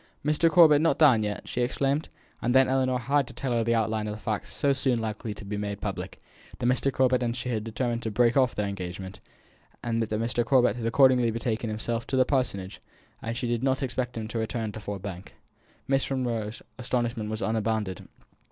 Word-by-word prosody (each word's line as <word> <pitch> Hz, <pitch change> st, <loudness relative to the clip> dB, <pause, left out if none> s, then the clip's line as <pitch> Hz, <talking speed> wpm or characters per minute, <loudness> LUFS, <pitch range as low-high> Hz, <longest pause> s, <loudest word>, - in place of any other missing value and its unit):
"Mr. 150 Hz, +2 st, +3 dB
Corbet 155 Hz, -3 st, +7 dB
not 165 Hz, -, +2 dB
down 135 Hz, -8 st, +6 dB
yet!" 105 Hz, -1 st, -4 dB
she 125 Hz, -, -2 dB
exclaimed. 135 Hz, +4 st, 0 dB, 0.3 s
And 120 Hz, +2 st, +1 dB
then 130 Hz, 0 st, +6 dB
Ellinor 130 Hz, -1 st, +1 dB
had 135 Hz, +3 st, +1 dB
to -, -, -10 dB
tell 135 Hz, -2 st, -3 dB
her 115 Hz, -1 st, +2 dB
the 115 Hz, +1 st, +2 dB
outline 110 Hz, -1 st, 0 dB
of 105 Hz, -, -3 dB
the -, -, -10 dB
facts 110 Hz, -1 st, -4 dB
so 140 Hz, -1 st, +2 dB
soon 130 Hz, -2 st, +1 dB
likely 110 Hz, 0 st, -4 dB
to 105 Hz, -, -9 dB
be 105 Hz, +1 st, -4 dB
made 100 Hz, -1 st, -3 dB
public; -, -, -5 dB, 0.4 s
that -, -, -4 dB
Mr. 130 Hz, +2 st, +2 dB
Corbet 130 Hz, -1 st, +2 dB
and 120 Hz, -1 st, -1 dB
she 125 Hz, 0 st, -4 dB
had 110 Hz, -3 st, -1 dB
determined 115 Hz, +1 st, -2 dB
to 115 Hz, -, -3 dB
break 120 Hz, +2 st, +3 dB
off 130 Hz, -2 st, +3 dB
their 105 Hz, -, -1 dB
engagement; 95 Hz, -1 st, -6 dB, 0.6 s
and 115 Hz, -1 st, 0 dB
that 110 Hz, -, -2 dB
Mr. 120 Hz, +1 st, 0 dB
Corbet 125 Hz, -4 st, +3 dB
had 115 Hz, -2 st, -3 dB
accordingly 125 Hz, -1 st, +5 dB
betaken 115 Hz, 0 st, -2 dB
himself 115 Hz, +2 st, -3 dB
to 135 Hz, -, -1 dB
the 130 Hz, -, +5 dB
Parsonage; 105 Hz, -9 st, -1 dB, 0.4 s
and -, -, -5 dB
that 115 Hz, -, -3 dB
she 125 Hz, -, -2 dB
did 120 Hz, -1 st, 0 dB
not 130 Hz, 0 st, +1 dB
expect 125 Hz, -1 st, -2 dB
him 110 Hz, -1 st, -4 dB
to 115 Hz, -, -3 dB
return 110 Hz, -1 st, -2 dB
to 110 Hz, -, -8 dB
Ford 100 Hz, -2 st, -6 dB
Bank. 95 Hz, -1 st, -7 dB, 0.5 s
Miss 135 Hz, 0 st, +1 dB
Monro's 115 Hz, -5 st, -2 dB, 0.2 s
astonishment 120 Hz, -3 st, -1 dB
was 110 Hz, 0 st, -3 dB
unbounded. 110 Hz, -4 st, -1 dB
120 Hz, 215 wpm, -27 LUFS, 110-130 Hz, 0.6 s, Corbet